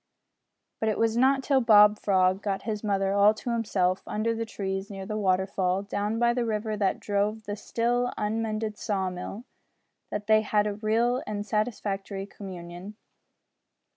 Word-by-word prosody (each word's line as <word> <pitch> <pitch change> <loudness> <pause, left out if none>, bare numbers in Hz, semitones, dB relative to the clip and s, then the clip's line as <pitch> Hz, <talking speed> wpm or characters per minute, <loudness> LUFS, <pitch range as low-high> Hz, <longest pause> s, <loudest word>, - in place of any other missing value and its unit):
But 220 - +1
it 215 - -1
was 225 0 +1
not 265 +2 +3
till 270 -1 +3
Bob 210 -2 +6
Frog 185 -1 +2
got 195 -2 -2
his 215 -1 -3
mother 195 -2 +1
all 200 +2 +5
to 240 +2 -4
himself, 195 -5 0
under 220 +2 0
the 230 0 -3
trees, 195 -2 -4
near 195 -2 -7
the 215 +2 -4
waterfall, 190 -1 +1
down 205 +2 -2
by 235 0 +3
the 245 0 0
river 215 -1 -2
that 200 -2 0
drove 210 +2 -1
the 205 0 -4
still 240 +3 0
unmended 215 0 -2
saw 190 -3 -1
mill, 180 +5 -7 0.7
that 210 0 -4
they 215 0 +5
had 210 -1 0
real 235 +4 +2
and 205 -1 -3
satisfactory 205 -3 -2
communion. 185 0 -9
210 Hz, 160 wpm, -27 LUFS, 195-225 Hz, 0.7 s, Bob